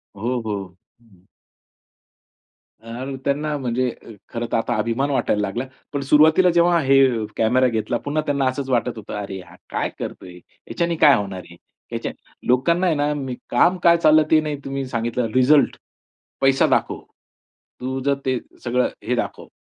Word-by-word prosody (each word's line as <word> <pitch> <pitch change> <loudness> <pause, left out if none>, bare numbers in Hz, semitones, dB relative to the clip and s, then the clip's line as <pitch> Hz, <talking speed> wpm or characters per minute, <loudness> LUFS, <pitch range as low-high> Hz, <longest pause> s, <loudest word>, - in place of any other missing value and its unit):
हो, 120 +5 -2
हो, 105 -2 -2 0.4
हं. 95 -6 -25 1.6
यार 130 +4 -6
त्यांना 150 +2 0
म्हणजे 125 -1 -1 0.4
खरंतर 120 -1 -3
आता 120 +1 -1
अभिमान 115 +6 0
वाटायला 105 -6 0
लागला, 105 +6 -2 0.3
पण 140 - -1
सुरुवातीला 155 +6 +5
जेव्हा 170 0 +4
हे 135 0 +4 0.4
कॅमेरा 125 +3 +3
घेतला 115 0 -1
पुन्हा 150 +2 0
त्यांना 140 -2 0
असंच 130 +1 -2
वाटत 120 -2 0
होतं, 110 - -8
"अरे, 95 -1 -6
हा - - -16
काय - - -2
करतोय, 90 -1 -7 0.3
याच्याने 170 0 -1
काय 145 - +8
होणार 100 -3 -3
आहे, 85 - -13 0.4
याच्याने" - - -6 0.2
लोकांना 170 +9 +2
आहे 165 - +2
ना, 145 0 0 0.4
काम 175 +9 +3
काय 170 0 +6
चाललं 155 -1 +5
ते 155 - +6
नाही 150 -1 -3
तुम्ही 135 0 -3
सांगितलं 115 -1 -2
रिझल्ट, 140 +3 +4 0.6
पैसा 135 0 +4
दाखव. - - 0 0.8
तू 130 +1 -3
जर 140 - +3
ते 130 -2 0 0.2
सगळं 125 +1 +1 0.2
हे 125 - +1
दाखव - - -4
130 Hz, 155 wpm, -21 LUFS, 115-145 Hz, 1.6 s, काय